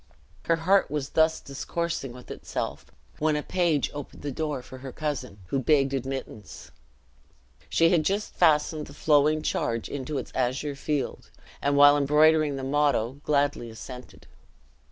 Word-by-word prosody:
Her 165 - +3
heart 185 +4 +3
was 145 -1 -3
thus 160 0 +3
discoursing 140 0 -4
with 125 +1 -12
itself - - -5 0.3
when 155 0 +2
a 150 - -2
page 170 -6 +1
opened 145 -1 -8
the 145 - -3
door 145 -2 -3
for 130 - -11
her 130 0 -7
cousin, 145 -9 -4
who 135 - 0
begged 140 0 +2
admittance. 130 -6 -6 1.0
She 165 0 +4
had 170 -4 +3
just 200 +6 -1
fastened 155 -2 +2
the 140 - -13
flowing 150 0 +3
charge 115 -6 -1
into 140 +1 -4
its - - -5
azure 130 +3 -1
field, 145 0 -3 0.3
and 140 0 +1
while 145 0 +8
embroidering 150 +1 +4
the 135 - -5
motto, 140 -2 +1
gladly 145 -5 0
assented. 125 +3 -10
145 Hz, 150 wpm, -26 LUFS, 135-155 Hz, 1.0 s, while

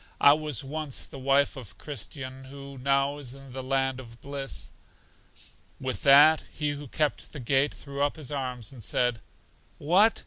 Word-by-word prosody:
I 140 - +8
was 150 -3 -1
once 150 0 -2
the 135 - -10
wife 140 +2 +3
of 105 -8 -10
Christian, 130 +1 -5
who 140 0 -10
now 140 +2 +1
is 130 -2 -6
in 135 -2 -13
the 130 - -4
land 135 0 0
of 115 -2 -12
bliss. 140 -1 -3 1.1
With 130 -1 -3
that, 145 +3 +7
He 150 -1 -1
who 145 0 -6
kept 150 +3 -1
the 150 - -6
gate 135 +3 +2
threw 140 -1 -6
up 145 0 +1
His 150 -4 -4
arms 125 -5 -3
and 125 -5 -12
said, 125 +1 +1 0.6
What! 190 +9 +4
140 Hz, 170 wpm, -28 LUFS, 130-145 Hz, 1.1 s, I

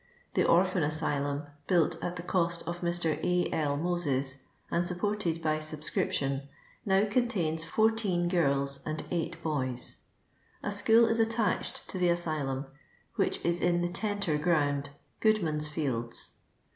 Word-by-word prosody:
The - - +3
Orphan 185 +1 +4
Asylum, 145 -1 0 0.2
built 170 -4 +2
at 175 - -2
the 175 - -6
cost 170 -2 0
of 175 +1 -4
Mr. 170 -3 0
A. 180 0 +1
L. 145 -2 +1
Moses, 145 -6 -1 0.3
and 170 - +2
sup 175 0 -2
ported 180 -5 -1
by 155 -1 +1
subscription, 150 -3 -2 0.3
now 195 0 +3
contains 205 -9 0
14 205 -1 +2
girls 140 -5 +1
and 155 +1 -3
8 170 -2 -2
boys; 130 -6 -3 0.6
a 205 - -1
school 225 +3 +5
is 225 0 +1
attached 225 -3 +1
to 185 - -4
the 180 -1 +3
asylum, 155 -6 -1 0.5
which - - 0
is 170 0 +1
in 175 0 +2
the 175 - 0
Tenter 200 -5 -1
Ground, 145 -4 +1 0.3
Goodman's 165 -9 +2
fields. 130 -7 -2
170 Hz, 140 wpm, -30 LUFS, 150-180 Hz, 0.6 s, school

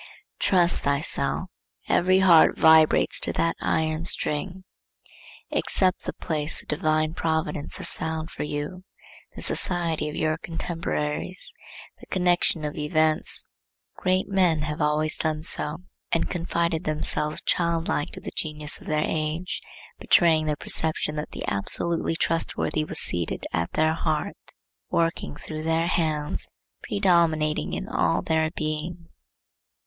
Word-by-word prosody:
Trust 175 -2 +3
thyself: 140 +1 0 0.4
every 185 +1 +3
heart 170 -4 +6
vibrates 160 -1 +5
to - - -1
that 165 0 0
iron 155 0 0
string. 180 +5 -1 0.9
Accept 185 -2 +1
the - - -3
place 155 -1 -3
the - - -14
divine 155 0 0
providence 160 -3 -2
has - - +5
found 160 0 -4
for - - -7
you, 150 +5 -4 0.5
the - - -8
society 165 -4 -1
of 150 - -7
your 155 0 0
contemporaries, 165 0 -3 0.5
the - - -14
connection 175 -3 +2
of 150 - -4
events. 155 +1 +2 0.5
Great 185 0 0
men 180 -6 +2
have 150 +1 -4
always 150 +1 +2
done 155 -1 -1
so, 155 +1 -1 0.3
and 165 - 0
confided 170 -1 -1
themselves 155 -1 0
childlike 165 -3 0
to - - -7
the - - -6
genius 150 -1 -4
of - - -13
their 155 0 +1
age, 160 +4 -2 0.4
betraying 160 -3 +4
their 150 - +1
perception 155 0 +3
that 150 - -4
the - - -7
absolutely 165 +12 +1
trustworthy 165 -1 -1
was - - -4
seated 85 -2 -2
at 85 0 -1
their 155 0 +2
heart, 160 -1 -3 0.3
working 165 -3 -1
through 155 +1 -7
their 165 +1 +1
hands, 155 -4 +1 0.3
predominating 155 - +1
in - - -4
all - - +1
their 160 0 +1
being. 160 +2 -4
160 Hz, 130 wpm, -25 LUFS, 150-170 Hz, 0.9 s, heart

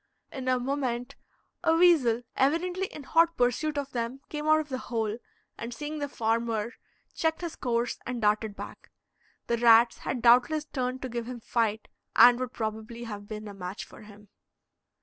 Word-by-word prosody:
In 260 -1 -6
a 255 -1 +3
moment 250 -2 -2 0.5
a 325 - +4
weasel, 295 -10 +4
evidently 355 +7 +1
in 300 - -10
hot 330 +3 +3
pursuit 270 +5 +1
of 280 -1 -3
them, 240 +2 -3
came 300 0 -4
out 310 0 +5
of 305 -1 -5
the 260 -1 -3
hole, 225 -1 -1 0.4
and 235 - -5
seeing 300 +4 -5
the 285 -1 -3
farmer, 230 -1 -1 0.4
checked 320 +1 -1
his 340 -2 -5
course 240 -1 -1
and 250 -1 -4
darted 210 -1 +1
back. - - -10 0.6
The 235 - 0
rats 235 0 +6
had 245 -3 -4
doubtless 250 +6 +5
turned 255 -3 -3
to 260 - -3
give 235 -1 -4
him 250 -1 -6
fight, 220 -2 -1 0.3
and 245 0 +8
would 255 -1 -3
probably 220 +1 -5
have 205 -3 -7
been 215 0 -7
a 205 - -8
match 185 0 -6
for - - -15
him. 210 -1 -15
245 Hz, 175 wpm, -28 LUFS, 225-285 Hz, 0.6 s, and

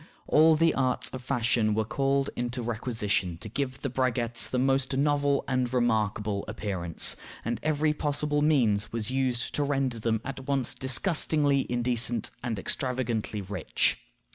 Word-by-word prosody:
All 160 +1 +5
the 165 +1 +3
arts 130 -2 0
of 130 - -6
fashion 120 -4 +1
were 110 0 0
called 135 +3 0
into 120 0 -3
requisition 110 -6 -1
to 100 - -8
give 130 +3 -3
the 140 - -1
braguettes 120 -2 +1
the 125 - -1
most 135 +1 +1
novel 145 0 +2
and 130 -2 0
remarkable 105 -4 0
appearance, 95 -6 0 0.3
and 115 -1 -2
every 155 0 +1
possible 150 0 -1
means 120 -9 +2
was 115 0 -3
used 130 -2 -1
to 145 - 0
render 135 -4 -1
them 110 0 0
at 135 -1 -6
once 135 -3 0
disgustingly 145 0 +1
indecent 120 -1 +1
and 120 -3 -3
extravagantly 120 -1 -2
rich. 95 +2 0
125 Hz, 145 wpm, -28 LUFS, 115-140 Hz, 0.3 s, All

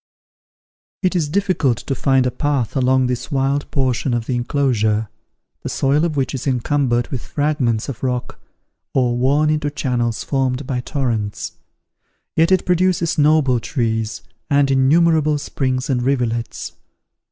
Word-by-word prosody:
It 185 0 +1
is 160 -4 0
difficult 165 - +1
to 135 - -4
find 135 -1 +2
a 125 - +1
path 140 -4 -1
along 130 0 +3
this 125 +4 -3
wild 140 +1 0
portion 130 -2 0
of 115 -1 -2
the 130 - -2
enclosure, 120 -4 0 0.5
the - - -5
soil 140 +3 +1
of 155 -4 -2
which 135 0 0
is 135 +1 -4
encumbered 125 -1 +1
with 130 -4 -4
fragments 145 -7 -1
of 135 -5 -6
rock, 125 -1 -3 0.6
or 125 -3 +2
worn 140 +5 +2
into 150 -1 0
channels 120 -5 -1
formed 135 -1 -1
by 125 -1 -2
torrents; 115 -7 -2 0.8
yet 165 +3 +3
it 185 -1 +3
produces 180 -2 +1
noble 145 -4 +4
trees, 115 -5 -2 0.3
and 140 -1 +3
innumerable 155 +3 +3
springs 130 -2 -2
and 130 -4 0
rivulets. 120 -3 -1
135 Hz, 140 wpm, -19 LUFS, 125-145 Hz, 0.8 s, noble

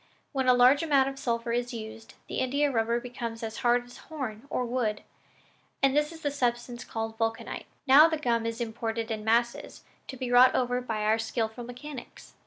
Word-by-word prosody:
When 265 -2 -1
a 250 - +6
large 250 +3 +6
amount 280 -4 +3
of 270 0 -9
sulphur 235 -2 -1
is 245 +1 -1
used, 220 0 -9
the - - -3
India 280 +3 +1
rubber, 235 0 +1
becomes 235 -2 -6
as 220 -1 -5
hard 245 0 +2
as 245 - -14
horn 260 -6 -7
or 250 - -1
wood, 235 -4 -1 0.8
and 275 0 +4
this 295 +1 +2
is 325 -1 -11
the 290 -2 -1
substance 240 -2 -2
called 225 0 -5
vulcanite. 225 0 -3 0.2
Now 290 +4 +8
the 320 - -1
gum 235 -5 0
is 230 +1 -4
imported 225 0 -3
in 215 -1 -3
masses, 235 +2 0 0.2
to 265 - -7
be 245 -1 -4
wrought 250 +1 +7
over 250 0 +1
by 225 -4 -3
our 215 +1 +2
skillful 225 +1 -2
mechanics." 250 +2 -10
245 Hz, 195 wpm, -28 LUFS, 225-265 Hz, 0.8 s, Now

